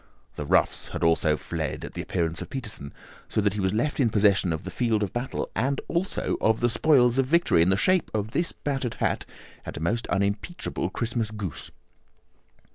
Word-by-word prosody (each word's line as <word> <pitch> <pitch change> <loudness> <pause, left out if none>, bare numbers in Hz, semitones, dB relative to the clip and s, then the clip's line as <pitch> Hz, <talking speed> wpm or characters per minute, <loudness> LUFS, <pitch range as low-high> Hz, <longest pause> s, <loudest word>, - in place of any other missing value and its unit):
The 75 - -5
roughs - - +2
had - - -5
also 80 -2 +3
fled - - -4
at - - -9
the - - -4
appearance 80 -3 -2
of - - -6
Peterson, 105 - -4 0.4
so - - 0
that 100 -2 +2
he 105 - -4
was 95 -1 +1
left 120 +9 -1
in 125 -4 +4
possession 100 -4 +3
of 80 -1 -3
the 95 - -6
field 110 +1 +1
of 100 - -3
battle, 120 +2 -3
and 135 +4 0
also 175 +3 -1
of 110 0 +3
the 120 - +2
spoils 130 -3 +4
of 135 - +2
victory 170 - +4
in 85 - +4
the 95 - +3
shape 185 - +2
of 110 0 -2
this 170 +6 +1
battered 135 -5 -3
hat - - -1 0.4
and - - -7
a - - -4
most 110 +9 -1
unimpeachable 100 - -1
Christmas 115 -2 -2
goose." 105 -7 -5
110 Hz, 200 wpm, -26 LUFS, 95-130 Hz, 0.4 s, in